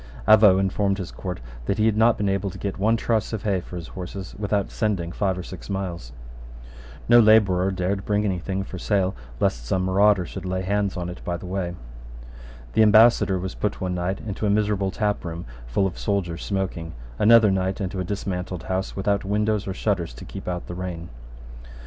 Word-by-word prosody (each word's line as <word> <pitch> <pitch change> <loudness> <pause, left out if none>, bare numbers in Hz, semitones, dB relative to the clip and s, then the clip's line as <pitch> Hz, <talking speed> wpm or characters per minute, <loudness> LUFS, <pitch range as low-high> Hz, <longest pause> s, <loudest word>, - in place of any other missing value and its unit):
Avaux 105 -3 +7
informed 95 0 +1
his 95 -2 -5
court 90 -2 -5 0.3
that - - 0
he 110 - +2
had 110 -2 +3
not 115 +1 +4
been 100 - 0
able 100 0 0
to - - -9
get 100 -1 -4
one 110 +3 +3
truss 115 -2 0
of 110 - -3
hay 100 -4 0
for 90 - -10
his 85 -2 -6
horses 95 +1 -7
without 100 -1 -1
sending 95 -6 -1
five 95 0 -1
or 90 - -5
six 95 +2 -10
miles. 90 -10 -4 1.0
No 120 +1 +7
labourer 100 -5 +5
dared 95 +1 -1
bring 105 0 0
any 95 -3 0
thing 95 +2 -3
for 95 -1 -8
sale 95 -2 +1 0.2
lest - - 0
some 90 +10 0
marauder 100 0 +4
should 95 +2 -7
lay 95 0 -2
hands 100 0 0
on 90 -1 -3
it 90 +1 -8
by 85 -1 -2
the 90 - -10
way. 90 -1 -3 1.0
The - - +4
ambassador 110 -2 +6
was 95 +1 -4
put 105 - -2
one 90 -2 -2
night 90 +2 -2
into 105 0 -3
a - - +2
miserable 100 -1 +1
taproom 95 -5 -2 0.2
full - - +1
of 95 - -3
soldiers 90 -5 -2
smoking, 95 -4 -3 0.3
another 110 -1 +6
night 95 +1 -1
into 95 -1 -3
a - - 0
dismantled 90 -2 -4
house 95 +1 -3
without 100 +1 0
windows 105 +1 0
or 95 - -2
shutters 95 - -1
to - - -10
keep - - -9
out 90 -1 -3
the - - -7
rain. 85 -2 -5
95 Hz, 200 wpm, -24 LUFS, 90-105 Hz, 1.0 s, Avaux